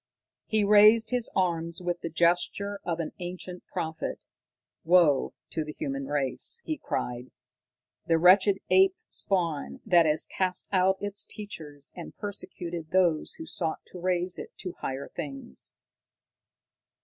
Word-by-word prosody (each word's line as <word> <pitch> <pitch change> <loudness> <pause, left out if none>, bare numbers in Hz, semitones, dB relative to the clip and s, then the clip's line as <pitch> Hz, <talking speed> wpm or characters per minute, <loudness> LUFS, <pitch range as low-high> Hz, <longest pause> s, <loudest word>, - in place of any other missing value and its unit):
He 215 -1 +2
raised 210 +2 +6
his 250 -2 +2
arms 170 -3 0
with 175 -1 -2
the 165 - -4
gesture 175 +5 +1
of 170 -1 -2
an 160 - -3
ancient 180 0 -7
prophet. 160 -3 -4 0.6
"Woe 165 -6 +4 0.2
to 160 - -1
the 150 - -6
human 135 -1 -4
race," 145 - -1
he 315 - -1
cried, 125 +1 -3 0.8
"the 165 - +4
wretched 190 +3 +6
ape 380 0 +6
spawn 165 - -1
that 170 -2 +5
has 150 +1 +3
cast 185 -1 0
out 190 0 +3
its 205 0 -1
teachers 150 -9 -8
and 175 - -9
persecuted 175 -5 -6
those 175 -4 +2
who 325 - -8
sought 165 - -3
to 180 - -8
raise 180 0 0
it - - -7
to 180 -3 -5
higher 135 +1 -4
things!" 135 - -5
175 Hz, 135 wpm, -28 LUFS, 160-195 Hz, 0.8 s, raised